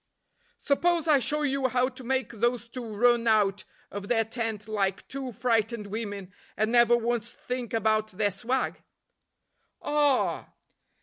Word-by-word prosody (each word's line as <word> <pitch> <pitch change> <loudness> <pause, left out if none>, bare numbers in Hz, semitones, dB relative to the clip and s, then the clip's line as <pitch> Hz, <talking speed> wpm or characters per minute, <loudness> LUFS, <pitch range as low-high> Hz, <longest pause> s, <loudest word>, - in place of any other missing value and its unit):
"Suppose 335 +3 +1
I 295 -3 +5
show 295 +5 0
you 275 -2 +1
how 250 0 +2
to 260 0 -9
make 260 -1 -1
those 240 +1 -1
two 245 +1 -6
run 240 +1 +3
out 205 -2 +2 0.3
of 200 0 -6
their 225 -1 +2
tent 225 -2 -4
like 200 -3 -1
two 270 -2 -5
frightened 230 -1 0
women, 200 -3 -5 0.2
and 215 +1 +1
never 240 0 +5
once 235 -1 -2
think 250 -2 -5
about 215 -1 +1
their 205 0 0
swag?" 235 +7 -2 1.0
"Ah!" 290 -3 +1
235 Hz, 140 wpm, -27 LUFS, 215-255 Hz, 1.0 s, I